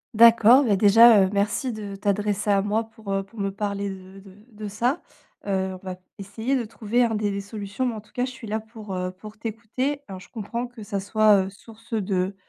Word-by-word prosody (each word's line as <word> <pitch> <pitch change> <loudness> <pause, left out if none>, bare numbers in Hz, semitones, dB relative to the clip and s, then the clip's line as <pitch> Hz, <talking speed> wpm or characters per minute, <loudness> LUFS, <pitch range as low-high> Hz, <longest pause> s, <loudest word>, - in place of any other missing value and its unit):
D'accord. 235 +3 +7
Bah, 210 -4 +3
déjà, 215 +2 +7
heu, - - -2
merci 210 +5 0
de 210 -3 -6
t'adresser 205 +1 -1
à 200 -1 +4
moi 215 +2 0
pour, 220 -2 -9
heu, 195 - +1
pour 210 +3 -14
me 195 0 -1
parler 200 0 -3
de 190 0 -11
de 195 0 -16
de 210 -1 -7
ça. 240 - -1 0.4
Heu, 190 -1 -1
on - - -8
va 185 -1 -4 0.2
essayer 220 +7 -2
de 245 -3 -1
trouver, 230 +2 0
hein, 230 -1 +1
des 205 -2 -1
solutions, 205 +4 -4
mais 245 - 0
en 215 - -7
tout 210 - -25
cas, 245 - -1
je 255 - -6
suis 255 -3 -10
là 215 +1 -1
pour, 215 -3 -9
heu, 180 0 -2
pour 210 +3 -12
t'écouter. 230 +6 -3
Alors 190 -2 -8
je - - -14
comprends 235 +2 -4
que 245 -2 -12
ça 205 -1 -3
soit, 210 0 +4
heu, 190 - -6
source 225 +3 -15
de, 195 -2 -1
210 Hz, 225 wpm, -24 LUFS, 200-230 Hz, 0.4 s, D'accord